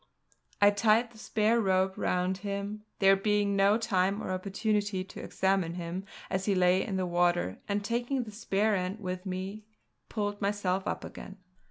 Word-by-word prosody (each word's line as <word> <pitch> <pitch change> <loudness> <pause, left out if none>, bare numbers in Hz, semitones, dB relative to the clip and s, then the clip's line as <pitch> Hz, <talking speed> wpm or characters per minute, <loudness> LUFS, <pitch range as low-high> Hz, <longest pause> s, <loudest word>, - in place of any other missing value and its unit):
I 205 0 +7
tied 225 +3 +3
the 225 - -16
spare 220 +2 +2
rope 190 -1 +2
round 180 +1 0
him, 200 +2 -4
there 195 0 +6
being 205 0 +1
no 200 +2 +4
time 195 -3 +1
or - - -3
opportunity 200 +1 -1
to 190 - -11
examine 190 -3 0
him 175 +2 -5 0.2
as 190 0 -2
he 200 - +2
lay 185 +1 +4
in 200 - -3
the 185 - 0
water, 175 - +1
and 205 0 -1
taking 240 +4 -1
the 215 - -9
spare 210 0 +1
end 185 +3 -2
with 185 -1 -5
me 190 +3 -4 0.5
pulled 205 -1 -2
myself 195 -2 0
up - - -2
again. 195 - -9
195 Hz, 170 wpm, -30 LUFS, 185-210 Hz, 0.5 s, I